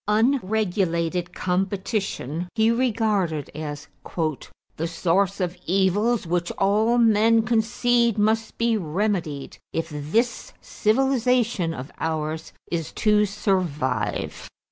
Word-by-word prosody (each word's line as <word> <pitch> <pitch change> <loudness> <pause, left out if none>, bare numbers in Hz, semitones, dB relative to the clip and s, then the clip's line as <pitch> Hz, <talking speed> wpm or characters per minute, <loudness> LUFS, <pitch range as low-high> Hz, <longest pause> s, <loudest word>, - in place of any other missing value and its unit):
Unregulated 195 -7 +1
competition 185 - -2
he 220 0 +4
regarded 215 - 0
as 150 -1 -6 0.9
"the 165 - -2
source 185 +4 +1
of 180 -1 -1
evils 195 +5 +2
which 175 +1 -1
all 215 +4 +2
men 225 0 +4
concede 235 +1 +2
must 220 +2 +1
be 230 0 +2
remedied 170 -5 -2
if 165 0 -2
this 225 - -1
civilization 240 -5 +1
of 135 -2 -7
ours 160 0 -3 0.2
is 165 -2 -2
to 210 -1 +3
survive." 150 - -1
195 Hz, 100 wpm, -24 LUFS, 165-225 Hz, 0.9 s, he